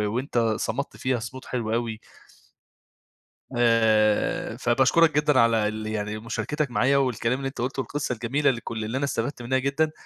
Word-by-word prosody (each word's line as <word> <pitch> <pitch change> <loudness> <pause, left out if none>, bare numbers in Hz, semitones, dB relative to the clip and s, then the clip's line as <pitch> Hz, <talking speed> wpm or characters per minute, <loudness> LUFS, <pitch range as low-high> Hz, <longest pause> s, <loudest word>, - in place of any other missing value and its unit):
وأنت 125 -1 -2 0.2
صمدت 140 +5 -3
فيها 130 -1 -1
صمود 130 +3 -8
حلو 115 -3 -3
أوي. 115 -2 -2 1.6
آآ، 110 -3 +2
فباشكرك 135 +6 +3
جدًا 150 -3 +3
على 115 -2 +3
ال 110 0 -4
يعني 105 0 -3
مشاركتك 140 +5 -3
معايا، 130 +6 +3
والكلام 125 -2 0
اللي 135 - -3
أنت 135 -3 -6
قُلته 130 +2 -3
والقصة 145 -1 -3
الجميلة 135 +5 +1
لكل 115 -2 -5
اللي 115 +4 -3
أنا 140 - 0
استفدت 120 0 -3
منها 130 +2 0
جدًا 140 +4 0
120 Hz, 155 wpm, -25 LUFS, 115-135 Hz, 1.6 s, فباشكرك